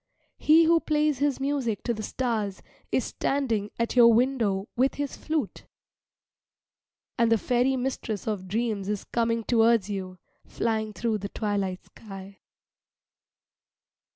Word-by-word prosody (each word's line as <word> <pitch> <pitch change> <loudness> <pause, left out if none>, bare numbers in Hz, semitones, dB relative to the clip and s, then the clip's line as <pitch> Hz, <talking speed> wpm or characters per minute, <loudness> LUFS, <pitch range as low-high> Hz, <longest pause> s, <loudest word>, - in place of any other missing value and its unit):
He 320 +2 +6
who 330 +1 +4
plays 300 -3 +1
his 285 -1 +1
music 270 -7 -1
to 235 - 0
the 215 - -5
stars 215 -4 -2 0.3
is - - +1
standing 230 -7 -1
at 230 +1 -1
your 235 -1 +8
window 225 -5 +1
with 260 +3 +2
his 285 -1 -3
flute. 310 -1 -3 1.5
And 230 -1 +3
the 225 - +5
fairy 250 +4 +1
mistress 245 -5 -3
of 205 -4 -3
dreams 210 -1 -2
is 210 -2 -2
coming 230 -1 -1
towards 225 -3 +3
you, 185 -2 -5 0.3
flying 220 -1 -2
through 220 0 -1
the 200 +1 -5
twilight 200 -4 -2
sky. 195 -2 -11
230 Hz, 130 wpm, -26 LUFS, 205-260 Hz, 1.5 s, your